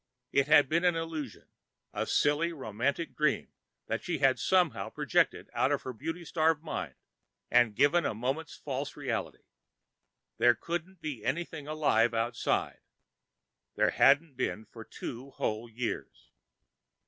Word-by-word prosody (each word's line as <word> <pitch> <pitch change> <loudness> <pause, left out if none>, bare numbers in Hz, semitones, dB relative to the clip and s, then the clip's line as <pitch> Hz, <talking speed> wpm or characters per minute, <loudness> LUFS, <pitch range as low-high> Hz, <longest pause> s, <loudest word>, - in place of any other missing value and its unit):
It 140 0 +3
had 145 -2 +6
been 165 +5 +2
just 180 - +3
an 175 - -2
illusion, 160 -7 -5 0.5
a - - -2
silly 150 +4 +2
romantic 135 +2 -2
dream 150 -2 +1 0.4
that - - -3
she - - -2
had 135 -1 +3
somehow 140 - +2
projected - - +1
out - - +2
of - - 0
her 130 - -5
beauty 165 +8 -5
starved 160 -1 +1
mind 160 - -4 0.6
and 120 -4 +4
given 170 +8 +4
a - - -1
moment's 135 +8 -3
false 140 0 -5
reality. 135 -6 -3 1.0
There 120 0 +6
couldn't 175 +4 -5
be 150 -7 -5
anything 150 +1 -3
alive 120 -7 +2
outside. 115 +1 -1 1.0
There - - +3
hadn't 145 +2 +4
been 110 -3 -2
for 115 +1 -11
two 125 +4 -7
whole 110 -3 -3
years. 115 +1 -5
140 Hz, 140 wpm, -30 LUFS, 120-160 Hz, 1.0 s, had